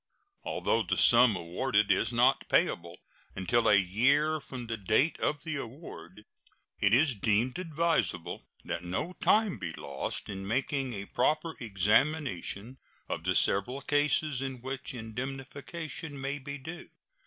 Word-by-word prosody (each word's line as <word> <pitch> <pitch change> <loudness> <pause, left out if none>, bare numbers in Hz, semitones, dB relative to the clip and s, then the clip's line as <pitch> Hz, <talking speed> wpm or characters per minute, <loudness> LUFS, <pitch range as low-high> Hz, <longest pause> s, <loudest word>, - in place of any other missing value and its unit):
Although - - 0
the - - -1
sum 120 -5 +7
awarded 100 +5 +1
is 115 - +2
not 120 +1 +3
payable 85 +1 +1 0.4
until 115 +5 +2
a 105 - +7
year 135 - +2
from 130 -4 -8
the 115 0 -3
date 110 - +2
of 150 -1 -1
the 155 -3 -3
award, 110 - -9 0.5
it 100 - +3
is 135 +4 +4
deemed 115 - 0
advisable 165 -1 -1 0.2
that 85 - -4
no 95 - -3
time 215 -3 +3
be 85 - -4
lost 70 -3 -4
in 95 -1 -6
making 130 +3 -1
a 100 -1 -5
proper 155 +8 0
examination 115 - 0 0.3
of 80 - -4
the 90 0 +1
several 125 +8 +2
cases 145 -1 +1
in 135 -2 -4
which 130 0 -6
indemnification 135 +6 -6
may 140 +2 -3
be 140 +1 -6
due. 160 +5 -9
130 Hz, 140 wpm, -30 LUFS, 105-145 Hz, 0.5 s, sum